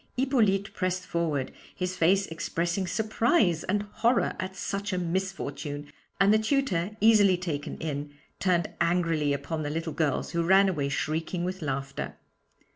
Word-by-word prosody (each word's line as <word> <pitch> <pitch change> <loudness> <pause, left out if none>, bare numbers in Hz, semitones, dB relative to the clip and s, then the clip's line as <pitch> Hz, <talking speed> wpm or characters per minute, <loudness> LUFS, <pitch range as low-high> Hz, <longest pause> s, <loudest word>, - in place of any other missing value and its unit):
Hippolyte 220 -7 +2
pressed 185 -1 -1
forward, 155 -7 -1 0.2
his 180 0 -2
face 190 +3 +3
expressing 170 +2 -2
surprise 215 - +2
and 205 +2 0
horror 230 +4 +1
at 190 -1 -4
such 200 +1 -3
a 185 - -1
misfortune, 150 -5 -3 0.3
and 195 +2 +5
the 215 - +5
tutor, 215 -6 0
easily 205 -4 +6
taken 160 -5 -4
in, 145 -2 -4 0.3
turned 175 -3 +1
angrily 165 -4 +2
upon 140 +3 -2
the 145 - -2
little 160 +1 -3
girls, 150 -3 0
who 170 - 0
ran 190 +3 +5
away 145 -6 -1
shrieking 160 +4 -2
with 185 +1 -3
laughter. 140 -2 -3
180 Hz, 145 wpm, -28 LUFS, 160-195 Hz, 0.3 s, easily